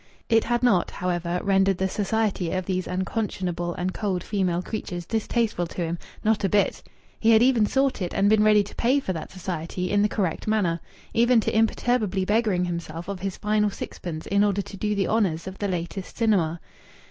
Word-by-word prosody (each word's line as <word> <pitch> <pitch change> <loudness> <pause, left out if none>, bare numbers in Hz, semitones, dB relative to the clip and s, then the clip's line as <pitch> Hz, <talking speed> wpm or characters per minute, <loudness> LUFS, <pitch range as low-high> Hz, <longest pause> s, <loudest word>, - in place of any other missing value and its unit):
It 225 -1 +4
had 240 0 0
not, 200 -8 +3
however, 175 -1 -2
rendered 195 -1 +3
the 190 - +1
society 205 -2 -1
of 185 -1 -1
these 185 -1 -2
unconscionable 180 -3 -2
and 185 +1 -2
cold 190 -4 -2
female 185 -4 0
creatures 180 -5 -5
distasteful 220 -4 -1
to 175 - -6
him. 170 +1 -3 0.2
Not 215 -1 +2
a 195 - +2
bit! 205 +1 +1 0.4
He 225 - +3
had 225 0 +6
even 245 -5 +4
sought 270 -2 +1
it 180 - -2
and 195 - +2
been 215 0 +5
ready 210 -1 +5
to 200 - -11
pay 255 +4 +2
for 190 -9 -3
that 160 - -6
society 180 -1 -4
in 205 - +3
the 210 - +3
correct 190 -5 -2
manner 190 -6 +1 0.3
even 235 +1 +4
to - - -2
imperturbably 220 -3 +1
beggaring 210 -4 +2
himself 170 -1 -5
of 200 -2 -4
his 195 0 -4
final 210 0 +1
sixpence 170 -4 -6
in 200 +1 +2
order 200 -1 +1
to 200 - -10
do 210 +1 -1
the 195 -1 +1
honours 190 -7 +1
of 190 0 -8
the 205 - -1
latest 180 +1 -4
cinema. 185 -8 +2
195 Hz, 195 wpm, -25 LUFS, 180-215 Hz, 0.4 s, had